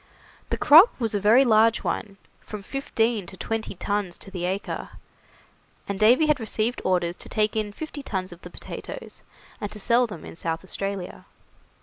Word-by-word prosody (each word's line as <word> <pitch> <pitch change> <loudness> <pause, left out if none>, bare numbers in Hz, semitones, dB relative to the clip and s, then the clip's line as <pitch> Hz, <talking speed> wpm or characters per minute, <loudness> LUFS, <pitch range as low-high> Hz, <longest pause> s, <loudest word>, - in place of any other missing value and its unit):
The - - -1
crop 320 - +7
was 225 -3 0
a 205 - +1
very 225 +7 +5
large 225 0 +4
one, 195 -3 -3 0.2
from 210 -2 -8
fifteen 225 -5 -1
to 190 - -10
twenty 225 +2 -3
tons 200 -1 -2
to 195 - -9
the 180 -2 -3
acre, 190 +3 -3 1.0
and 200 -1 -3
Davy 245 +8 +5
had 300 -2 +2
received 225 +1 -1
orders 175 -2 +1
to - - -7
take 215 0 0
in 215 -1 -1
fifty 295 +5 -7
tons 190 -7 -4
of 175 - -16
the - - -10
potatoes, - - -8 0.4
and 205 - -4
to 210 - -7
sell 235 +4 +3
them 195 -7 -9
in - - -10
South 165 0 -3
Australia. 195 0 -5
210 Hz, 180 wpm, -25 LUFS, 190-230 Hz, 1.0 s, crop